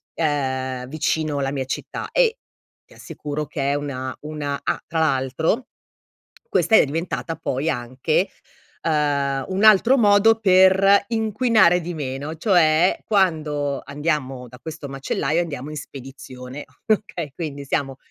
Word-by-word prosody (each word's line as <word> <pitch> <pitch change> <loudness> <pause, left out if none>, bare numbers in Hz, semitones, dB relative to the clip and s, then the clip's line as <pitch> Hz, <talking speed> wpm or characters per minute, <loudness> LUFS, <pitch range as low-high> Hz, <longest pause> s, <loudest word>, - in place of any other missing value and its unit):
uhm, 130 -5 -1
vicino 155 0 -1
alla 135 -1 -1
mia 135 -2 -3
città 130 - -5
e - - +2 0.5
ti - - -20
assicuro 150 0 -6
che 140 -2 -2
è - - +1
una 130 -3 -4
una 150 -2 -4
ah, - - -1
tra 160 - -2
l'altro 155 - 0 0.8
questa 220 - +3
è - - +6
diventata 160 -1 -3
poi 135 +5 -2
anche, 130 +7 -1 0.5
uhm, 140 -3 0
un 190 +2 -1
altro 220 +5 +6
modo 220 0 +5
per 195 0 +5
inquinare 220 -5 +3
di 175 +1 -5
meno: 145 +1 -5
cioè, 170 -3 +3
quando 155 -8 0
andiamo 140 -3 -3
da 125 +1 -14
questo 160 -3 -7
macellaio 135 +4 -1
andiamo 145 -5 -5
in 155 - -6
spedizione, 135 -1 -9 0.2
okay. 195 -8 -1
Quindi 145 -4 -5
siamo 135 -1 -2
150 Hz, 135 wpm, -22 LUFS, 135-180 Hz, 0.8 s, è